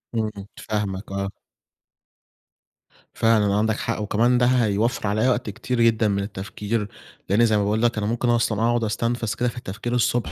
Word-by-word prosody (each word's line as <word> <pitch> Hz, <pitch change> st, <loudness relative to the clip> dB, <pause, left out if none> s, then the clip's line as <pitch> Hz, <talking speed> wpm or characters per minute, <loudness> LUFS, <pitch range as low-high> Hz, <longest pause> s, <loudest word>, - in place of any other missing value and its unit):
إمم، 110 Hz, -1 st, 0 dB, 0.3 s
فاهمك 105 Hz, -2 st, -3 dB
آه. 100 Hz, 0 st, -2 dB, 1.8 s
فعلًا 105 Hz, -3 st, +3 dB
عندك 110 Hz, +1 st, +1 dB
حق، 115 Hz, -2 st, -2 dB
وكمان 115 Hz, +4 st, +2 dB
ده 125 Hz, -, +3 dB
هيوفّر 115 Hz, -2 st, +1 dB
عليّا 110 Hz, +5 st, +2 dB
وقت 120 Hz, -3 st, 0 dB
كتير 120 Hz, +4 st, -2 dB
جدًا 115 Hz, -1 st, +3 dB
من 100 Hz, -1 st, 0 dB
التفكير، 105 Hz, +2 st, -4 dB, 0.4 s
لإن 110 Hz, +5 st, +4 dB
زي 110 Hz, -2 st, +2 dB
ما 105 Hz, -, +1 dB
باقول 105 Hz, +2 st, 0 dB
لك 120 Hz, -1 st, +2 dB
أنا 105 Hz, -1 st, -1 dB
ممكن 120 Hz, +2 st, 0 dB
أصلًا 115 Hz, -2 st, +1 dB
أقعُد 120 Hz, 0 st, +2 dB
أُستنفز 115 Hz, +1 st, -1 dB
كده 125 Hz, -1 st, 0 dB
في 120 Hz, -, -10 dB
التفكير 120 Hz, +2 st, -5 dB
الصبح 120 Hz, 0 st, +1 dB
110 Hz, 170 wpm, -23 LUFS, 105-120 Hz, 1.8 s, لإن